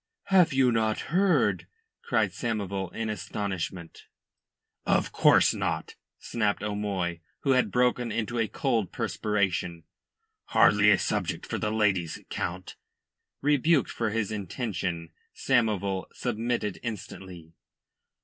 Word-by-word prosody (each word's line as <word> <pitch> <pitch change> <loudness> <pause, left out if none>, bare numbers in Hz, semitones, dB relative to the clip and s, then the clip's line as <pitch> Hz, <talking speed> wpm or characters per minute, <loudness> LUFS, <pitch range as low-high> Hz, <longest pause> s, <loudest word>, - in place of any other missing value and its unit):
"Have 180 -3 +6
you 130 -2 +3
not 110 +3 0
heard?" 190 +1 +2 0.3
cried 475 - +1
Samoval 100 -5 -3
in 115 0 -3
astonishment. 95 -5 -5 0.8
"Of - - +1
course - - +5
not," - - -2 0.2
snapped 105 -3 -1
O'Moy, 100 -5 -2 0.2
who 135 - +1
had 130 -1 +3
broken 125 -1 +1
into 115 +2 -2
a 115 - +2
cold 115 -9 -1
perspiration. 90 -5 -1 0.6
"Hardly 105 0 +5
a 100 - +6
subject - - -2
for - - -3
the 105 - -1
ladies, 100 -7 +1
Count." 90 +1 -4 0.7
Rebuked 150 +1 +3
for 115 -2 -1
his 110 -1 -1
intention, 95 -5 -3 0.2
Samoval 100 -5 +1
submitted 115 -3 -2
instantly. 95 -6 -7
105 Hz, 110 wpm, -27 LUFS, 95-120 Hz, 0.8 s, Have